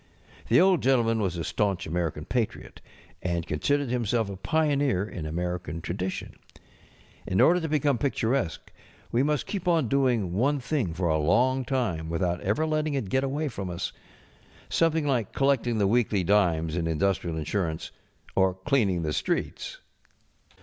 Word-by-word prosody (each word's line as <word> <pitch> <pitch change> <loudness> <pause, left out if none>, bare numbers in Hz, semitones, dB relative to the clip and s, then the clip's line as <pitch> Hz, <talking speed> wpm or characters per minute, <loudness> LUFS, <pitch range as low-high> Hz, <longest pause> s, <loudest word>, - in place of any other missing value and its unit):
The - - +5
Old 185 -1 +4
Gentleman 115 -4 +2
was 90 -4 -1
a 85 - -2
staunch 100 +2 -1
American 80 -2 -2
patriot, 120 -4 -3 0.4
and 85 -2 -1
considered 140 - 0
himself 115 -3 0
a - - -6
pioneer 140 - +1
in 80 -7 -6
American 90 0 -3
tradition. 90 +3 -4 0.9
In 95 - 0
order 180 +2 +6
to 160 -2 -3
beernne 145 -4 +1
picturesque 130 - -1 0.4
we 120 - +2
must 150 0 +1
keep 190 -3 -4
on 165 -7 +3
doing 120 -9 +1
one 140 +9 +2
thing 125 - -1
for 90 0 0
a 80 -1 +2
long 125 +12 +2
time 115 -11 -1
without 85 +1 -1
ever 105 +11 0
letting 155 -1 0
it 120 -8 -2
get 130 +4 +1
away 145 +3 -1
from 100 -8 -5
us. 90 +1 -4 0.8
Something 160 -2 +2
like 125 -7 0
collecting 135 -4 +1
the 105 - +2
weekly 105 -2 +2
dimes 85 -5 +2
in 85 -1 -1
indus┬¼ 90 +4 +1
trial 85 -2 -4
insurance. 80 0 -2 0.4
Or 95 -1 +3
cleaning 100 -6 +1
the 75 -1 -1
streets. - - -2
105 Hz, 155 wpm, -27 LUFS, 90-135 Hz, 0.9 s, order